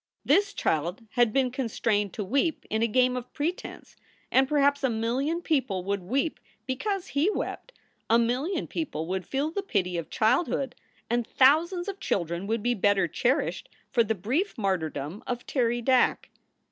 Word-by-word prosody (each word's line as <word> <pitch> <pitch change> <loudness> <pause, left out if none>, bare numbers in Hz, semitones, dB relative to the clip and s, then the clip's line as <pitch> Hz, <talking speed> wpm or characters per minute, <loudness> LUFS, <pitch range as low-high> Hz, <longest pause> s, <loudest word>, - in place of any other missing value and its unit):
This 400 +7 +3
child 175 +8 -1
had 240 -2 +3
been 260 +1 +2
constrained 220 -5 0
to 210 - -3
weep 280 - 0
in 220 +1 +1
a 230 - +3
game 250 +2 +3
of 250 0 -6
pretense 315 +4 -4 0.4
and 265 +1 +4
perhaps 285 0 +2
a 265 - +3
million 255 +9 -1
people 260 - 0
would 200 +1 -1
w 180 +2 -13
r 265 - +2
eep 320 - -6 0.3
because 355 +9 -2
he 290 +7 +2
wept, - - -4 0.4
a 230 - +6
million 260 +10 0
people 305 - -3
would 185 +1 -3
feel 280 +3 -1
the 400 - -2
pity 185 - -1
of 165 - -7
childhood, 255 +3 +1 0.3
and 240 0 0
thousands 335 +7 +3
of 395 -1 -5
children 170 - -2
would 225 0 -1
be 245 - +2
better 200 -4 +2
cherished 265 - 0 0.2
for 240 -3 +4
the 220 0 -1
brief 265 - -1
martyrdom 175 -4 -2
of 245 0 -3
Terry 240 -2 0
Dack. 255 0 +2
245 Hz, 170 wpm, -27 LUFS, 205-285 Hz, 0.4 s, a